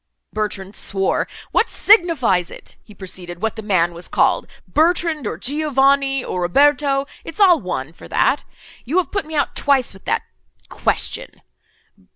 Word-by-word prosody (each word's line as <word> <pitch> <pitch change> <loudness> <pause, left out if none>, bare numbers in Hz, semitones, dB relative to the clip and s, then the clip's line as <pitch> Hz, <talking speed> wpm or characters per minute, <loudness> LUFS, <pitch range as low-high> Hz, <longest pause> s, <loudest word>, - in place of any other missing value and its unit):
Bertrand 205 -2 -4
swore. 195 -1 -1 0.2
"What - - +2
signifies 300 - +3
it," - - -10
he 210 - -16
proceeded, 180 -2 -7
"what 225 +2 -2
the 220 - -6
man 180 -5 +1
was 170 +1 -6
called—Bertrand, 320 -4 +1
or 160 - -4
Giovanni—or 275 - +1
Roberto? 275 +7 +3 0.2
it's 330 +2 -9
all 365 -5 +6
one 160 -6 -4
for - - -13
that. - - +1 0.4
You 295 +9 -1
have 355 -6 +1
put 395 -6 -2
me 315 - -6
out 290 - 0
twice 270 -6 +2
with 190 - -17
that—question. - - -3
265 Hz, 140 wpm, -20 LUFS, 190-305 Hz, 0.4 s, all